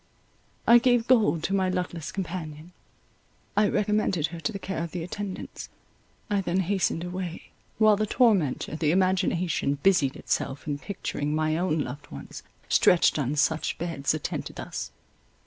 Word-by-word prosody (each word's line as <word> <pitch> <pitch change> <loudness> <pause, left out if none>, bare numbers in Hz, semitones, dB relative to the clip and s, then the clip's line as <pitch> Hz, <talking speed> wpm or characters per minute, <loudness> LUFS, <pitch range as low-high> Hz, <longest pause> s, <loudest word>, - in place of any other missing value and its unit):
I 235 +1 +8
gave 245 -2 +3
gold 215 -10 +3
to 195 - -1
my 190 -1 +2
luckless 180 -4 -3
companion; 165 -3 -6 0.8
I 210 0 +4
recommended 210 -6 +1
her 170 - -6
to 195 - -2
the 200 - -4
care 190 -3 -4
of 170 - -6
the 175 -2 -3
attendants; 190 +2 -6 0.6
I 205 -2 +1
then 185 0 0
hastened 185 -2 0
away; 180 -1 -6 0.3
while 215 -1 +5
the 215 +1 0
tormentor, 200 - +2
the 155 -2 +1
imagination, 180 -5 +1
busied 160 -9 +3
itself 135 - -2
in 145 -1 -3
picturing 150 -5 -3
my 155 0 +1
own 165 -2 0
loved 145 +2 -6
ones, 70 - -9 0.3
stretched 170 -3 +4
on 140 +1 -1
such 150 +2 +1
beds, 160 -4 -1
attended 155 - -4
thus. - - -5
180 Hz, 150 wpm, -27 LUFS, 155-195 Hz, 0.8 s, I